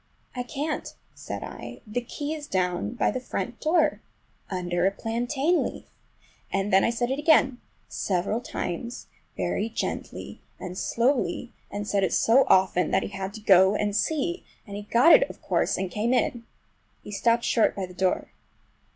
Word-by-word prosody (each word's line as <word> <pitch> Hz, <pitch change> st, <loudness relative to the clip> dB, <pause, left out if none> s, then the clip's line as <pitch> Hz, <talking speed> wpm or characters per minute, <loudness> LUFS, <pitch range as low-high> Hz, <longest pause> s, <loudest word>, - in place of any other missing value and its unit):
"I 250 Hz, -, -2 dB
can't," 285 Hz, +5 st, -4 dB, 0.2 s
said -, -, -6 dB
I. -, -, -8 dB
"The 220 Hz, +3 st, -2 dB
key 290 Hz, +5 st, -4 dB
is 300 Hz, -2 st, -7 dB
down 185 Hz, +3 st, -1 dB
by -, -, +2 dB
the 255 Hz, -, -3 dB
front 255 Hz, -, -4 dB
door 325 Hz, +1 st, +2 dB, 0.5 s
under 175 Hz, -1 st, 0 dB
a -, -, +2 dB
plantain 245 Hz, -, 0 dB
leaf!" -, -, -6 dB, 0.7 s
And 195 Hz, +1 st, -1 dB
then 190 Hz, -, +6 dB
I -, -, +3 dB
said 240 Hz, +2 st, -1 dB
it 270 Hz, -, -1 dB
again, 295 Hz, -5 st, +4 dB, 0.3 s
several 200 Hz, +4 st, -1 dB
times, 235 Hz, +3 st, -5 dB, 0.3 s
very 220 Hz, -, -1 dB
gently -, -, -5 dB, 0.2 s
and 180 Hz, -1 st, -6 dB
slowly, 245 Hz, +2 st, 0 dB, 0.2 s
and 205 Hz, 0 st, -5 dB
said 200 Hz, -2 st, +1 dB
it 190 Hz, -, +1 dB
so 255 Hz, +4 st, +5 dB
often 185 Hz, -3 st, +4 dB
that 190 Hz, -, +2 dB
he -, -, -4 dB
had 195 Hz, -1 st, -5 dB
to 215 Hz, -, -8 dB
go 190 Hz, -1 st, +6 dB
and 205 Hz, -1 st, 0 dB
see, 320 Hz, -, 0 dB, 0.2 s
and 200 Hz, -3 st, -8 dB
he 205 Hz, -, -4 dB
got 255 Hz, +9 st, +7 dB
it, -, -, +6 dB
of -, -, -10 dB
course, -, -, 0 dB
and 185 Hz, -1 st, -3 dB
came 230 Hz, +4 st, +1 dB
in. 240 Hz, -1 st, 0 dB, 0.6 s
He -, -, -9 dB
stopped 230 Hz, +3 st, +2 dB
short 225 Hz, -, +2 dB
by 195 Hz, -, -2 dB
the 180 Hz, -, -12 dB
door. 185 Hz, 0 st, 0 dB
225 Hz, 175 wpm, -26 LUFS, 195-255 Hz, 0.7 s, got